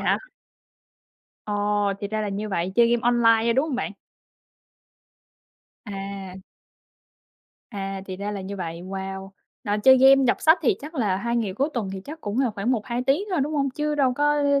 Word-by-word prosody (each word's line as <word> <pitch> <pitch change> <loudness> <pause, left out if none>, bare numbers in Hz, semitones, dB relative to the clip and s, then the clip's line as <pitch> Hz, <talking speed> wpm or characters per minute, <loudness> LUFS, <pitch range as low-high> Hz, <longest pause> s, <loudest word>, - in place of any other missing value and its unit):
hả? - - +1 1.3
Ồ, 205 -1 0
thì 200 - -3
ra 215 +1 -2
là 210 - -2
như 205 +2 -4
vậy, 185 -1 -2
chơi 235 +2 +5
game 240 0 +2
online, 235 -1 +4
đúng 270 +5 +2
hông 300 - -3
bạn? 245 -3 -3 1.9
À. 195 -2 -6 1.3
À, 195 -2 -5
thì 185 - -6
ra 200 +2 -4
là 200 -2 -4
như 195 +2 -6
vậy, 170 -2 -5
wow. 190 +1 -6 0.4
Nội 205 +1 0
chơi 260 +5 +7
game 270 +1 +6
đọc 245 - +3
sách 320 +2 +5
thì 270 - +2
chắc 305 +3 -9
là 210 -8 0
2 235 +4 -2
ngày 205 -5 -1
cuối 275 +6 0
tuần 215 -6 -2
thì 190 - -5
chắc 315 +2 -9
cũng 215 +2 -2
là 255 - +1
khoảng 210 +3 -2
1-2 240 0 -1
tiếng 275 +9 +2
thôi, 360 -6 +1
đúng 295 +3 -1
hông? 275 -2 +1
Chứ 300 +3 -2
đâu 270 -3 +2
có, 295 +2 +2
ơ, 285 -1 +2
220 Hz, 195 wpm, -24 LUFS, 195-265 Hz, 1.9 s, chơi